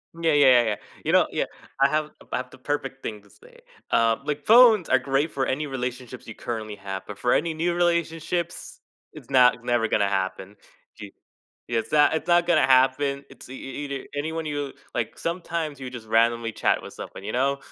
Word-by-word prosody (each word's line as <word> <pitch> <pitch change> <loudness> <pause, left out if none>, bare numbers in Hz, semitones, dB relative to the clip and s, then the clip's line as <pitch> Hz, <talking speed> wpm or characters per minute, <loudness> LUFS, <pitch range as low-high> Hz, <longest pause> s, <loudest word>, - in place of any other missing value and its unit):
Yeah, 165 -1 +1
yeah, 145 -2 +5
yeah, 125 -2 +6
yeah, 110 -2 0 0.3
you - - 0
know - - +5
yeah, - - -1 0.4
I 140 - +6
have 155 +1 -1 0.2
I - - 0
have 125 0 -5
the 130 - -15
perfect 135 0 -4
thing 105 -2 -5
to 105 - -22
say, - - -19 0.3
um, 115 +2 +2
like, 145 0 -3
phones 225 -5 +7
are 130 - +5
great 135 +4 0
for 135 -1 -1
any 145 +4 -2
relationships 125 -1 -6
you 115 - -7
currently 110 -3 -5
have, 95 -1 -6
but 105 -1 -9
for 120 - +2
any 165 0 +1
new 170 +2 -1
relationships, 170 0 -1 0.3
it's - - -13
not 125 -2 +5
it's 120 - -19
never 120 -2 +1
gonna 100 -1 +2
happen, 95 0 -3 0.5
y - - -7 0.6
Yeah, 115 -1 0
it's 110 - -7
not 150 -1 +4
it's 160 - -4
not 175 0 +4
gonna 155 -6 +3
happen, 135 +2 +3
it's - - -14
e 130 - -8
e 135 +2 -7
e-either 140 -1 -5
anyone 160 +2 -3
you 145 -2 -3 0.2
like - - -3
sometimes 165 -4 -3
you 130 - -6
just 120 -3 -10
randomly 115 +1 +2
chat 110 - +1
with - - -10
someone, - - -9
you 105 - -4
know? 135 +3 +1
135 Hz, 210 wpm, -25 LUFS, 120-155 Hz, 0.6 s, phones